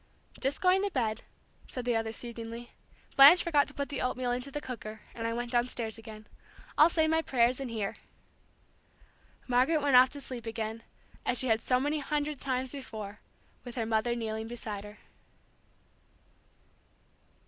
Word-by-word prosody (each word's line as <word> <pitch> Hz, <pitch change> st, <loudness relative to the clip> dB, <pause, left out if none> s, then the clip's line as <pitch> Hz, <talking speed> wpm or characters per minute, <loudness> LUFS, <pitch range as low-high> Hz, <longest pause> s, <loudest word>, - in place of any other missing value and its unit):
"Just 270 Hz, +1 st, -1 dB
going 370 Hz, +1 st, +4 dB
to 405 Hz, -, 0 dB
bed," 225 Hz, -, -1 dB, 0.5 s
said 250 Hz, -2 st, -5 dB
the 240 Hz, -1 st, +1 dB
other, 225 Hz, 0 st, -1 dB
soothingly. 235 Hz, 0 st, -6 dB, 0.4 s
"Blanche 285 Hz, +6 st, +9 dB
forgot 295 Hz, -4 st, +3 dB
to 290 Hz, -, -10 dB
put 280 Hz, 0 st, -3 dB
the 285 Hz, -, -3 dB
oatmeal 250 Hz, 0 st, -1 dB
into 250 Hz, +3 st, -2 dB
the 295 Hz, -, -4 dB
cooker, 220 Hz, -5 st, -7 dB
and 230 Hz, -1 st, -3 dB
I 230 Hz, -, -1 dB
went 240 Hz, 0 st, -3 dB
downstairs 240 Hz, -2 st, -1 dB
again. 215 Hz, -1 st, -11 dB, 0.5 s
I'll 310 Hz, -, +7 dB
say 320 Hz, -2 st, +2 dB
my 320 Hz, +1 st, +2 dB
prayers 250 Hz, -3 st, +2 dB
in 270 Hz, -2 st, -4 dB
here." 215 Hz, -4 st, -3 dB, 1.5 s
Margaret 260 Hz, +6 st, +3 dB
went 280 Hz, -3 st, +4 dB
off 255 Hz, +1 st, +8 dB
to 285 Hz, -, -7 dB
sleep 245 Hz, -4 st, -7 dB
again, 225 Hz, 0 st, -4 dB, 0.4 s
as 250 Hz, -, +1 dB
she 260 Hz, -, +4 dB
had 225 Hz, 0 st, +3 dB
so 250 Hz, +2 st, +2 dB
many 295 Hz, +3 st, 0 dB
hundred 295 Hz, 0 st, -2 dB
times 260 Hz, -1 st, -2 dB
before, 215 Hz, -7 st, -7 dB, 0.4 s
with 245 Hz, -1 st, -8 dB
her 230 Hz, -3 st, -1 dB
mother 225 Hz, +2 st, +1 dB
kneeling 220 Hz, -1 st, -3 dB
beside 215 Hz, -3 st, -6 dB
her. 210 Hz, +1 st, -11 dB
245 Hz, 165 wpm, -30 LUFS, 225-275 Hz, 1.5 s, Blanche